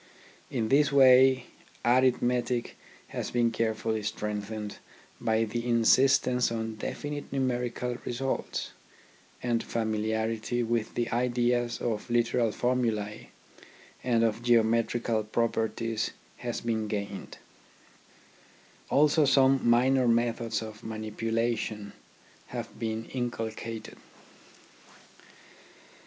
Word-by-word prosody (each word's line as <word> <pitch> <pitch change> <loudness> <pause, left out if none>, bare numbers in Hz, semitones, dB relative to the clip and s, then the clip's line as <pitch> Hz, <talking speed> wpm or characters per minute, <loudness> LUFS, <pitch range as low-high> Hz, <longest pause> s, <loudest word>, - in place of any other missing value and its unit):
In 115 -4 -1
this 140 +1 +4
way 130 -1 +6 0.4
arithmetic 125 -1 +2 0.3
has - - -4
been 120 -1 +2
carefully 110 -1 -1
strengthened 105 0 -4 0.4
by 110 0 +1
the 115 +2 -3
insistence 125 +1 +4
on 115 -1 -3
definite 145 +6 -5
numerical 125 -2 -1
results, 130 +2 -3 0.7
and 120 -2 +1
familiarity 110 +1 -1
with 115 -1 -1
the 120 -1 0
ideas 120 0 +1
of 115 -1 -3
literal 120 -1 +2
formulae 115 -4 -1 0.7
and 120 -2 +2
of 115 0 0
geometrical 115 -1 +2
properties 115 0 -1 0.3
has 120 -1 -4
been 110 -2 -1
gained; 100 -1 -5 1.5
also 150 +2 +4
some 135 -1 +5
minor 130 +2 +4
methods 115 -1 +1
of 110 +1 -9
manipulation 110 -1 -2 0.5
have - - -7
been 110 0 -3
inculcated. 115 -2 -4
115 Hz, 90 wpm, -28 LUFS, 110-125 Hz, 1.5 s, way